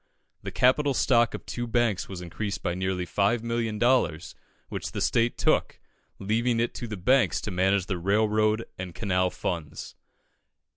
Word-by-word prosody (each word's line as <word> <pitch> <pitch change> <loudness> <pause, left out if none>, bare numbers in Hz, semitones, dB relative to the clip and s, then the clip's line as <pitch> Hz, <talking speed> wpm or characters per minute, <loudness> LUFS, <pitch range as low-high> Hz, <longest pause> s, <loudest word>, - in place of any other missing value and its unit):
The - - -5
capital 135 +2 +2
stock 120 -3 +3
of - - -9
two 120 0 -4
banks 115 -4 0
was 95 -2 -6
increased 90 +4 -5
by 85 - 0
nearly 95 0 -2
5,000,000 115 +5 0
dollars, 105 -10 +1 0.3
which - - -5
the - - -3
State 115 0 +1
took, - - +1 0.4
leaving 115 +4 0
it 120 - 0
to 120 - -6
the 105 -2 -5
banks 125 +8 +3
to 110 - -5
manage 95 +1 +2
the 95 -3 -3
railroad 110 +3 +2
and 90 -2 -6
canal 90 -2 +1
funds. 85 -4 -5
105 Hz, 155 wpm, -27 LUFS, 90-120 Hz, 0.4 s, stock